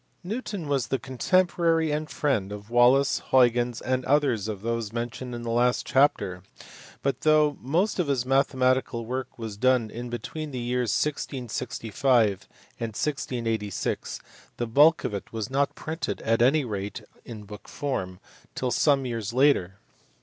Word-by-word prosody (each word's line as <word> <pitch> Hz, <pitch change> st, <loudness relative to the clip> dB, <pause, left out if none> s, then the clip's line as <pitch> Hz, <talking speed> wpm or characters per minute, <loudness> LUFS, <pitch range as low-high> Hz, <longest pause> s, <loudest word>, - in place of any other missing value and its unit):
Newton 205 Hz, -4 st, -4 dB
was 135 Hz, -5 st, 0 dB
the 135 Hz, -, 0 dB
contemporary 165 Hz, +5 st, +1 dB
and 150 Hz, +1 st, -2 dB
friend 115 Hz, -10 st, -1 dB
of 105 Hz, +2 st, -9 dB
Wallis, 125 Hz, +3 st, +4 dB
Huygens, 120 Hz, -2 st, +3 dB
and 130 Hz, 0 st, -1 dB
others 130 Hz, -7 st, +2 dB
of 105 Hz, -2 st, -5 dB
those 115 Hz, -2 st, -2 dB
mentioned 120 Hz, +1 st, -4 dB
in 120 Hz, -, -6 dB
the 115 Hz, -, -3 dB
last 120 Hz, +1 st, +2 dB
chapter, 100 Hz, -10 st, +2 dB, 0.6 s
but, 135 Hz, -2 st, -1 dB
though 155 Hz, -1 st, +4 dB
most 175 Hz, -, 0 dB
of 175 Hz, -, +1 dB
his 130 Hz, -3 st, 0 dB
mathematical 130 Hz, -3 st, +1 dB
work 130 Hz, +2 st, -5 dB
was 110 Hz, -3 st, -6 dB
done 125 Hz, -1 st, +2 dB, 0.2 s
between 155 Hz, +6 st, -5 dB
the 130 Hz, -, -6 dB
years 125 Hz, 0 st, -1 dB
1665 120 Hz, -4 st, 0 dB, 0.3 s
and 115 Hz, -2 st, -4 dB
1686, 115 Hz, -, -2 dB, 0.4 s
the 120 Hz, -, -1 dB
bulk 145 Hz, +8 st, +5 dB
of -, -, -2 dB
it 100 Hz, -, -6 dB
was 110 Hz, +1 st, -4 dB
not 140 Hz, +1 st, +1 dB
printed 160 Hz, +2 st, -4 dB
at 115 Hz, +1 st, +2 dB
any 140 Hz, +4 st, +4 dB
rate 105 Hz, 0 st, -5 dB, 0.2 s
in 110 Hz, -3 st, -9 dB
book 105 Hz, 0 st, -11 dB
form 95 Hz, -11 st, -4 dB, 0.4 s
till 130 Hz, -1 st, -1 dB
some 140 Hz, -1 st, +3 dB
years 115 Hz, -3 st, -3 dB
later. 125 Hz, -9 st, +3 dB
125 Hz, 150 wpm, -26 LUFS, 115-140 Hz, 0.6 s, bulk